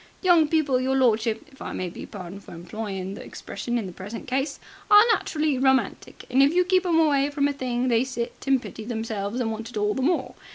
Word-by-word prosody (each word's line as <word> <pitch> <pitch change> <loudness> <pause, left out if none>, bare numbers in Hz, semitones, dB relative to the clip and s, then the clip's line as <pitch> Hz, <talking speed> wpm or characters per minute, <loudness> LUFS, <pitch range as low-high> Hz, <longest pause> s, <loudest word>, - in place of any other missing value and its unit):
Young 345 -4 +5
people, 295 -5 +2
your 265 +1 0
lordship, 225 -3 +2
if 270 - -19
I - - -5
may 185 - -3
be 175 - -8
pardoned 195 0 -9
for - - -11
employing 190 +2 -5
the 205 - -8
expression 240 0 -5
in 225 - -2
the 185 - -6
present 195 +5 -8
case, 270 +3 -1 0.3
are 415 0 +9
naturally 305 -8 0
romantic 265 0 0
and 260 +2 +4
if 285 +5 +4
you 360 0 +4
keep 370 0 +2
'em 335 -2 +3
away 285 -3 +3
from 285 -1 +1
a 285 - -1
thing 255 -2 -2
they 235 -1 +3
sit 245 -3 -4
and 270 -1 +4
pity 220 - -9
themselves 220 -1 -3
and 225 -3 -1
want 225 +1 -6
it 235 - -7
all 210 0 +1
the 265 - -3
more. 330 +7 0
255 Hz, 230 wpm, -25 LUFS, 220-285 Hz, 0.3 s, are